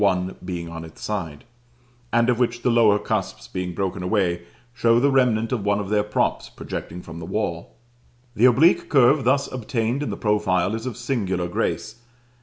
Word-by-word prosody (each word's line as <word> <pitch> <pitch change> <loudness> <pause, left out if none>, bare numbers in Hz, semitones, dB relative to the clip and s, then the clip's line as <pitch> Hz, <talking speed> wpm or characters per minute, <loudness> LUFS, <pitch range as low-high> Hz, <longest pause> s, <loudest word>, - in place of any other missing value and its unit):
1 95 -2 +1
being 90 -2 -5
on 80 0 -7
its 80 - -12
side), 85 -9 -4 0.7
and 120 0 +3
of 125 -1 +2
which 120 -1 0
the 125 - +3
lower 110 -3 +5
cusps, - - -3
being 90 -1 -4
broken 95 0 -2
away, 90 -2 0 0.3
show 115 -1 +3
the 140 +3 +3
remnant 120 -4 +2
of 120 -6 -1
one 100 0 +1
of 100 -1 -4
their 105 0 +3
props 105 0 -1
projecting 90 +2 -7
from 85 - -9
the 80 - -7
wall. 95 -4 -3 0.6
The 115 - +4
oblique 135 +8 +4
curve 135 0 +4
thus 140 +2 +3
obtained 120 +1 -2
in 145 - -2
the - - -4
profile 105 -3 +1
is 115 +3 -4
of 125 - -5
singular 100 -8 -1
grace. 100 +2 -2
105 Hz, 185 wpm, -23 LUFS, 90-120 Hz, 0.7 s, lower